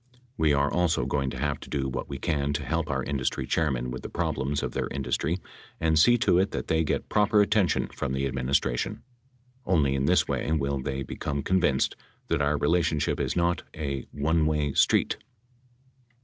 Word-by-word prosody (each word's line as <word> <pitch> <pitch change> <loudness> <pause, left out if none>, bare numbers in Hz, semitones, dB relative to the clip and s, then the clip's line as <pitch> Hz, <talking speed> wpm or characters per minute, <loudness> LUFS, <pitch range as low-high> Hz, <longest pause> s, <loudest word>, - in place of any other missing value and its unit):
We 80 -8 +2
are 70 0 +2
also 90 -2 +1
going 70 -2 0
to 65 - -6
have 70 +1 -1
to - - -11
do 70 -2 -1
what 65 - -4
we 70 - -4
can 70 -2 -1
to 70 -1 -3
help 80 +2 -1
our 65 -2 -1
industry 70 -2 -2
chairmen 65 -6 0
with 65 - -6
problems 70 +2 -1
of - - -2
their - - -2
industry 70 +4 -1 0.4
and 80 -1 +2
see 120 +9 +6
to 90 - +4
it 95 +1 +2
that - - -5
they 80 0 +2
get 75 - -1
proper 105 0 +3
attention 105 -4 +3
from 65 -1 -4
the 65 +1 0
administration. 65 -2 -1 0.6
Only 75 -7 +2
in 70 0 0
this - - +3
way - - -1
will 70 -3 0
they 70 0 -3
become 70 +2 -4
con 95 0 +2
vinced 70 -6 +2 0.4
that - - +1
our 75 +1 +2
relationship 75 0 +1
is - - -1
not 85 0 +1
"a 70 -4 -4
one 80 +2 +1
way 75 -2 0
street." - - +3
75 Hz, 190 wpm, -27 LUFS, 70-80 Hz, 0.6 s, see